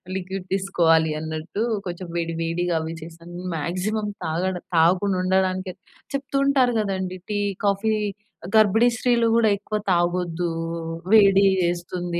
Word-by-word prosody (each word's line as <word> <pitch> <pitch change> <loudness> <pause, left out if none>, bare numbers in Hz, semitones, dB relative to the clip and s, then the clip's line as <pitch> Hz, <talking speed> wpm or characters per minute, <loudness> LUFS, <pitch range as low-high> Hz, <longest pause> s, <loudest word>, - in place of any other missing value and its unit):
Liquid, 190 0 -5
తీసుకోవాలి 165 -5 +2
అన్నట్టు, 160 +6 -4 0.2
కొంచెం 175 +1 -6
వేడి, 165 -1 -2
వేడిగా 170 +1 -1
అవి 160 +1 -5
చేశాను. 170 +1 -11 0.2
మాక్సిమం 195 +7 -2 0.2
తాగడం 180 +3 -2
తాగకుండా 185 +4 +3
ఉండడానికే 185 0 0 0.4
చెప్తుంటారు 275 -2 +1
గదండీ! 190 -3 -2
టీ, 205 - 0 0.3
కాఫీ 200 +2 +1 0.6
గర్భిణీ 220 +3 +5
స్త్రీలు 240 -1 +2
గూడా 225 -2 +4
ఎక్కువ 210 +2 -3 0.2
తాగొద్దు, 175 -1 0 0.6
వేడి 200 -2 +6 0.2
చేస్తుంది. 175 0 -2
185 Hz, 115 wpm, -23 LUFS, 170-205 Hz, 0.6 s, వేడి